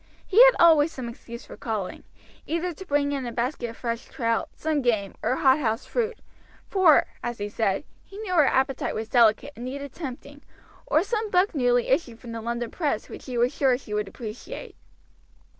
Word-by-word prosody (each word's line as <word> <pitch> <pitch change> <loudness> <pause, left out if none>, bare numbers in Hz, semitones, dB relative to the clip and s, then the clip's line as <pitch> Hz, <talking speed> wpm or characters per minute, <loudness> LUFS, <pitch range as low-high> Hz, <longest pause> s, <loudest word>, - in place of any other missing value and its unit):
He 435 +6 +7
had - - +6
always 325 -2 +6
some 255 -5 -6
excuse 235 0 -9
for - - -10
calling, 215 -5 -4 0.4
either 335 +2 -1
to 380 +5 -10
bring 285 0 +1
in 275 -2 -2
a - - -4
basket 240 +1 -2
of 230 - -10
fresh 235 -1 -3
trout, 230 -2 -1
some 310 -2 -1
game, 215 -6 0
or 255 - +1
hothouse 265 -5 +2
fruit, 470 -2 -1 0.5
for, 365 -6 +5 0.2
as 240 -1 -4
he 205 - -3
said, 205 0 0 0.2
he 395 - -13
knew 420 -4 -4
her 305 -6 +5
appetite 265 0 0
was 220 0 -3
delicate 240 +4 +3
and 240 - -7
needed 280 +1 -6
tempting, 285 -1 -8 0.5
or 315 - +3
some 435 +1 -2
book 370 +1 +3
newly 245 -4 +2
issued 255 -5 0
from 235 - -9
the 230 0 -5
London 235 0 -3
press 290 -10 -2
which - - -10
he 250 -2 -4
was 240 +2 +2
sure 265 -3 +2
she 220 -5 -9
would 210 -1 -1
appreciate. 220 +2 -8
260 Hz, 190 wpm, -25 LUFS, 235-310 Hz, 0.5 s, He